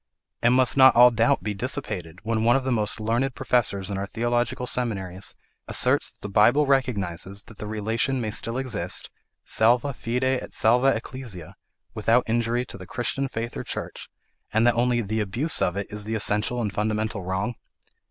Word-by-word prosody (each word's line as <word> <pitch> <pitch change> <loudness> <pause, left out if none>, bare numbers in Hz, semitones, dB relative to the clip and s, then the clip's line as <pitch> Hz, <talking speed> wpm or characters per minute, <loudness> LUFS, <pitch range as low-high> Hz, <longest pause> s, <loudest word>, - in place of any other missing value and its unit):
And 120 +1 +4
must 130 -1 +3
not 130 0 +7
all 125 +1 +8
doubt 115 +4 +2
be 105 - -2
dissipated, 105 - -4
when 110 0 -1
one 120 +2 +4
of 135 - +1
the 130 - -1
most 110 -2 +1
learned 120 +5 -1
professors 115 -7 0
in 95 - -3
our 100 - -3
theological 120 +3 -1
seminaries 100 -7 -2 0.3
asserts - - +4
that - - -22
the - - -4
Bible 110 +9 +4
recognises 100 -8 -1
that 110 - -16
the 105 - -6
relation 110 +5 -1
may 110 -3 -2
still 115 +3 -2
exist, 115 -10 -3 0.3
salva 120 +5 +2
fide 120 +1 -3
et 130 0 -1
salva 120 +4 +3
ecclesia' 115 -8 -8 0.4
(without 115 +3 +2
injury 120 +2 0
to - - -10
the 90 - -10
Christian 135 +5 -1
faith 115 -2 -5
or - - -4
church) - - -6 0.4
and 110 +2 +2
that 120 - +5
only 120 0 +1
'the 110 +1 -2
abuse 115 +10 0
of 90 +2 0
it 100 - -2
is 105 0 -4
the 110 +2 -3
essential 110 +3 +1
and 105 - -3
fundamental 110 0 -2
wrong?' 95 +6 -2
115 Hz, 180 wpm, -25 LUFS, 105-125 Hz, 0.4 s, all